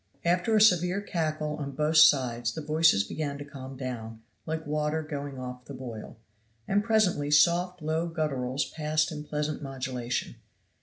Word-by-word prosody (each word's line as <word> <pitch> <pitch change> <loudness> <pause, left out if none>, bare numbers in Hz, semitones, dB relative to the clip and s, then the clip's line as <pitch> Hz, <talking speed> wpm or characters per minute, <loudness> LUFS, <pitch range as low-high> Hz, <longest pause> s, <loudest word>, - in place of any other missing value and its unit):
After 180 +6 +2
a - - +5
severe 180 -2 +4
cackle 155 -5 -2
on 140 -2 -5
both 150 +3 +1
sides 125 -6 +5
the 160 - -5
voices 155 -8 +4
began 145 +5 -4
to 145 - -7
calm 135 -2 -9
down 115 -4 -6 0.2
like 160 0 -3
water 150 +1 -1
going 145 -2 -6
off 125 -1 -7
the 140 - -8
boil, 120 -6 -8 0.5
and 205 +1 +2
presently 205 -10 +2
soft 175 +3 +3
low 160 +2 0
gutturals 135 -4 -1
passed 155 +1 0
in 150 -1 -6
pleasant 150 0 -3
modulation. 130 -3 -4
150 Hz, 155 wpm, -28 LUFS, 130-160 Hz, 0.5 s, a